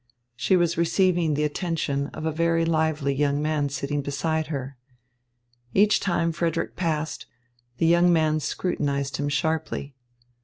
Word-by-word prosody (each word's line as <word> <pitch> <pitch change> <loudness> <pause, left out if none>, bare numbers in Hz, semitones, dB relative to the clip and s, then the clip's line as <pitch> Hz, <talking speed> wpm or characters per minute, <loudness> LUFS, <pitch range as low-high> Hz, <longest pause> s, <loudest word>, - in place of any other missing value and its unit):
She 185 +9 +2
was 170 -1 +1
receiving 170 -2 +2
the 150 - 0
attention 150 -3 -1
of 155 - -7
a 160 - +1
very 165 +1 +1
lively 160 -3 +1
young 145 +1 +1
man 150 -1 0
sitting 140 +1 -2
beside 155 +3 -1
her. 140 -3 -5 1.0
Each 210 +2 +5
time 170 -3 0
Frederick 165 0 -2
passed, 160 -3 -2 0.5
the - - +1
young 175 +2 +5
man 155 -2 +2
scrutinised 140 -4 -2
him 145 0 -1
sharply. 145 -1 -2
155 Hz, 140 wpm, -25 LUFS, 145-170 Hz, 1.0 s, Each